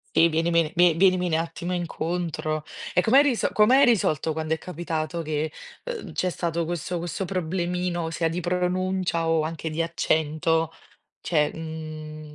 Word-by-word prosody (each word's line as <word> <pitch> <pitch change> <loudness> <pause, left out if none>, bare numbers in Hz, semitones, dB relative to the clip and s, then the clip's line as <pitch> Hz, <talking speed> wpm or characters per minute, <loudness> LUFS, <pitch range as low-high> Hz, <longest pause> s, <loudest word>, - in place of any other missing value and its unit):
Sì, 170 - +6
vienimi 165 0 +2
vie 175 -1 +6
vienimi 185 +1 +3
un - - -3
attimo 165 +2 -2
incontro. 165 -3 -2 0.3
E - - +4
com'hai 255 +9 +6
riso 270 -5 +1
com'hai 250 +6 +5
risolto 160 - +2
quando 160 0 -2
è 160 - +1
capitato 165 -1 -3
che, 155 0 -2 0.3
uhm, - - -6
c'è 185 - 0
stato 170 -1 -2
questo 175 +1 -3
questo 175 +3 -3
problemino 180 -1 -2
sia 165 0 0
di 170 +2 -3
pronuncia 180 -1 0
o 165 -1 +3
anche 160 0 -3
di 155 - -3
accento? 160 0 +1 0.5
Cioè, 150 -3 +2
mhmm 155 -1 -7
165 Hz, 150 wpm, -25 LUFS, 160-180 Hz, 0.5 s, Sì